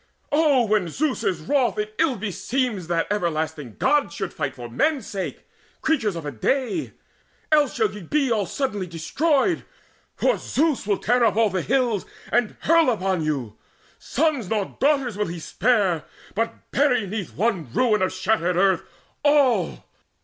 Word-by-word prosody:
O, 290 -5 +4
when 210 -4 +1
Zeus 280 - -1
is 175 -4 0
wroth, 250 - +1
It 210 0 -3
ill 315 -5 +3
beseems 220 -1 -2
that 170 -1 +1
everlasting 160 - -2
Gods 295 -1 +1
Should 195 -4 -4
fight 145 -5 -3
for 120 -2 -7
men's 255 - 0
sake, 200 -4 -5 0.4
creatures 230 - +1
of 165 -2 -6
a 145 - -3
day: 265 - -1 0.6
Else 295 -3 +3
shall 220 -3 +1
ye 210 - -8
be 275 - 0
all 210 -4 +1
suddenly 210 -8 -2
destroyed; 280 - +1 0.5
For - - +1
Zeus 300 -7 0
will 200 -2 +2
tear 245 +1 +2
up 230 - +3
all 220 -2 +3
the 185 -1 -1
hills, 240 -4 0 0.2
and 240 -3 +1
hurl 330 -3 +4
Upon 190 -6 0
you: 135 -8 -3 0.4
sons 285 - 0
nor 210 -3 -2
daughters 275 -6 +2
will 210 - +1
he 170 +1 -5
spare, 190 -1 +1 0.3
But 225 +3 -3
bury 250 -6 +2
'neath 195 -1 -5
one 190 - -1
ruin 215 - +2
of 185 - +1
shattered 185 -2 0
earth 190 -2 +3 0.4
All. 275 - +2
215 Hz, 160 wpm, -23 LUFS, 180-265 Hz, 0.6 s, O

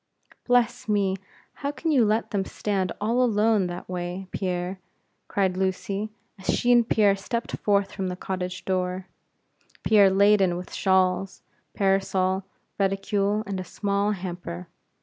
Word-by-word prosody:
"Bless 245 -1 +2
me, 200 -2 +2 0.4
how 280 - -1
can 320 +2 -2
you 265 -6 +5
let 215 +1 +1
them 200 -3 0
stand 190 -2 -2
all 230 +4 +1
alone 215 -4 +3
that 175 0 -7
way, 180 +1 -4
Pierre," 180 0 -2 0.5
cried 190 -2 +1
Lucy, 195 +2 -1 0.3
as 190 - -10
she 245 - +2
and 240 -1 +5
Pierre 205 -2 +4
stepped 230 +4 -3
forth 200 -1 +2
from 190 -2 -3
the 180 - -3
cottage 185 0 -4
door, 185 0 -1 0.8
Pierre 205 -3 +6
laden 195 -2 +4
with 180 - -8
shawls, 190 0 +1 0.3
parasol, 190 -1 +1 0.4
reticule, 200 +1 +1
and 195 -2 -3
a - - -3
small 200 +2 0
hamper. 175 -2 -6
195 Hz, 140 wpm, -25 LUFS, 185-210 Hz, 0.8 s, Pierre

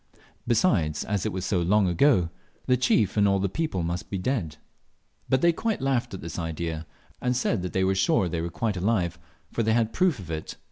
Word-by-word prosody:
Besides, 95 - +2
as 105 -4 -1
it - - -2
was 95 0 -4
so 90 -4 +1
long 100 +3 +3
ago, 90 - +3 0.3
the 125 - +4
chief 110 -5 +2
and 100 -1 +5
all 100 0 +3
the 100 +1 0
people 100 - -2
must 85 +2 -3
be 100 - -2
dead. 90 - -2 0.7
But 130 0 +3
they 170 0 +4
quite 225 +5 -1
laughed 130 -5 0
at - - -8
this 85 +2 -6
idea, 80 -1 -4 0.3
and 125 0 +1
said 115 -5 0
they 90 +1 -1
were 95 +1 +2
sure 95 -1 +2
they 85 -1 -2
were 85 - -3
alive, 95 -4 0 0.3
for - - -1
they 110 0 +2
had 115 -1 +1
proof 180 -7 +2
of 90 -5 -8
it. 80 0 -5
95 Hz, 205 wpm, -26 LUFS, 85-120 Hz, 0.7 s, and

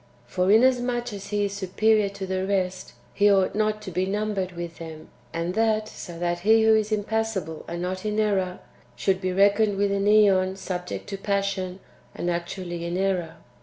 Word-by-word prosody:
For 180 +10 0
inasmuch 245 +1 +3
as 200 0 -7
He 205 0 0
is 200 - -3
superior 205 +2 +2
to 200 -1 -6
the 190 0 -2
rest, 185 -2 -2 0.2
He 205 0 +4
ought 195 -1 +3
not 215 0 0
to 190 - -6
be 185 +2 0
numbered 200 -2 -2
with 170 -1 -7
them, 160 -2 -9 0.2
and 170 +2 -2
that 220 0 +1
so 175 -5 -9
that 175 0 -1
He 220 +4 +4
who 220 0 +6
is 215 0 0
impassible 210 -6 -2
and 170 +1 -4
not 185 +1 -3
in 210 0 -1
error 190 -4 0 0.3
should 190 +10 0
be 185 -1 -1
reckoned 200 +2 +3
w^ith 200 0 +1
an 200 0 0
^on 195 -3 +4
subject 180 -2 -5
to 200 - -4
passion, 195 -2 -2 0.3
and 175 - -1
actually 175 0 -4
in 170 +1 -2
error. 185 -4 -1
195 Hz, 185 wpm, -25 LUFS, 180-210 Hz, 0.3 s, who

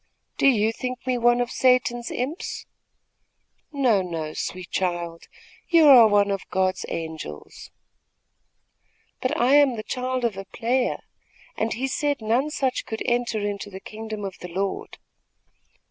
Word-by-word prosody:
Do - - +4
you 220 -4 +4
think 255 +1 -5
me 255 -1 0
one 240 +1 +4
of 245 - -2
Satan's 250 -2 +2
imps?" 275 +8 -4 1.1
"No, 255 -9 +2
no, 165 -4 -4
sweet 180 -1 -5
child; 175 -2 -2 0.4
you 335 -2 +6
are 250 -5 +9
one 205 -1 +3
of 195 -1 -1
God's 185 0 0
angels." 160 - -7 1.5
"But 270 +5 -1
I 250 +3 +4
am 285 -3 +5
the 215 - -5
child 255 0 -2
of 215 -5 -1
a 195 - -6
player, 245 +5 -1 0.5
and 220 +1 -1
he 250 +4 -2
said 285 +1 -1
none 235 +6 +1
such 270 -5 -2
could 220 - -4
enter 240 -3 0
into 205 0 -3
the 190 -1 -8
kingdom 215 0 -7
of 190 -2 -7
the 180 - -7
Lord." 190 +3 -3
230 Hz, 145 wpm, -24 LUFS, 195-255 Hz, 1.5 s, are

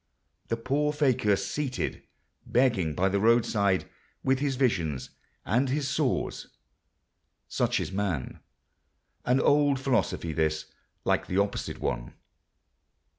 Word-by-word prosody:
The 115 - -1
poor 140 +5 0
fakir 130 -8 +2
seated 125 +8 -3 0.5
begging 110 - +2
by 95 +2 +2
the 100 +1 +1
roadside; 110 -4 +3 0.4
with 130 0 +2
his 140 -1 0
visions—and 105 - -1
his 140 +1 0
sores! - - -1 1.0
Such - - 0
is - - -3
man.... 95 -9 -2 0.9
An 125 +2 +3
old 145 -1 +3
philosophy 125 - 0
this—like 80 -1 -2
the 90 - -2
opposite 100 0 -1
one. - - -3
115 Hz, 105 wpm, -28 LUFS, 95-135 Hz, 1.0 s, roadside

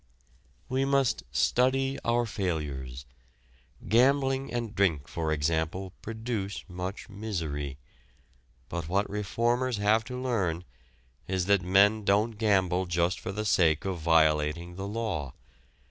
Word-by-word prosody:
We 130 +1 0
must 135 -2 +2
study 135 - +2
our 120 +1 +2
failures. 70 - -3 0.8
Gambling 135 +5 +3
and 120 -3 -3
drink, 85 -9 +1
for 80 -2 -2
example, 80 +5 -1
produce 110 -3 -4
much 90 +1 -6
misery. 80 -10 -4 0.9
But 85 0 -5
what 100 +3 +1
reformers 120 +4 0
have 105 +2 +3
to 125 0 -5
learn 100 -10 -1 0.6
is 95 -1 0
that 100 -1 +4
men 100 +4 +4
don't 105 +3 +3
gamble 95 -4 +2
just 85 +1 +1
for - - -5
the 105 +2 -3
sake 85 -6 +3
of 95 -3 -2
violating 80 +1 +2
the 95 +2 -5
law. 100 - -3
95 Hz, 120 wpm, -28 LUFS, 85-115 Hz, 0.9 s, that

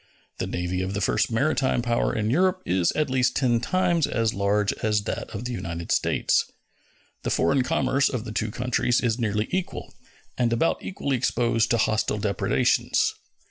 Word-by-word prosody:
The - - -2
navy 90 +1 -2
of 95 +1 -3
the - - -1
first 95 - +1
maritime 130 0 +1
power 120 -1 +1
in 110 0 -1
Europe 185 +5 +2
is 90 -2 +2
at 155 -1 0
least 125 -1 +2
ten 120 -4 +2
times 175 +3 +1
as 115 -2 0
large 100 +1 +1
as 105 -1 +1
that 110 - -4
of 110 +3 -6
the 125 - -3
United 85 -7 -5
States. - - +1 0.7
The - - -3
foreign 140 -1 +2
commerce 130 +2 +1
of 125 -4 -4
the 110 - -6
two 110 +1 -1
countries 125 +1 0
is 120 -1 0
nearly 105 -1 0
equal, 185 -1 -4 0.5
and 120 -2 +2
about 120 +8 +1
equally 140 -8 -2
exposed 115 -2 +1
to 120 - +3
hostile 110 -1 +1
depredations. 100 -1 +1
115 Hz, 175 wpm, -25 LUFS, 105-130 Hz, 0.7 s, to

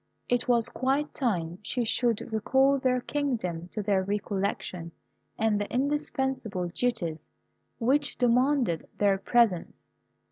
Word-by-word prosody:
It 245 0 0
was 235 -2 +3
quite 275 +3 -1
time 180 - -1
she 245 +3 -1
should 230 0 0
recall 265 +5 +3
their 255 -1 +1
kingdom 225 - -2
to 210 +3 -5
their 200 -2 +2
recollection 195 -3 -3 0.4
and 215 -2 +1
the 205 - -4
indispensable 265 -8 -1
duties 170 -8 -2 0.5
which 270 +5 +1
demanded 250 - +2
their 200 -2 +3
presence. 210 -4 +2
230 Hz, 115 wpm, -28 LUFS, 195-260 Hz, 0.5 s, was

